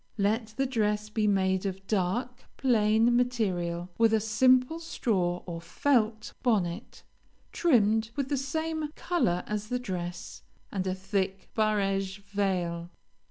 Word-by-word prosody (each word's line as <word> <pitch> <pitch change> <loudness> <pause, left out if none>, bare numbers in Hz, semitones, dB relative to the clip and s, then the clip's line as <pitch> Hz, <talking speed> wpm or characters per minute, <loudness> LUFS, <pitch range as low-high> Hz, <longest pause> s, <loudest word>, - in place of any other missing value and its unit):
Let 215 +2 0
the 270 - +2
dress 210 -4 0
be 215 0 0
made 190 -2 +2
of 195 0 -6
dark, 220 +6 -1
plain 225 -1 +3
material, 185 -8 0
with 225 -1 +5
a - - +3
simple 255 +7 +3
straw 185 - -1
or 170 -2 -6
felt 220 0 0
bonnet, 205 -4 -1 0.5
trimmed 220 -8 +3
with 275 -2 -2
the 290 - +1
same 315 +3 -2
color 180 - 0
as 210 0 -3
the 250 - -1
dress, 180 -7 -5 0.3
and 190 -2 -2
a 185 - 0
thick 190 0 -2
barege 195 -3 +1
veil. 185 -4 -1
210 Hz, 130 wpm, -29 LUFS, 190-245 Hz, 0.5 s, with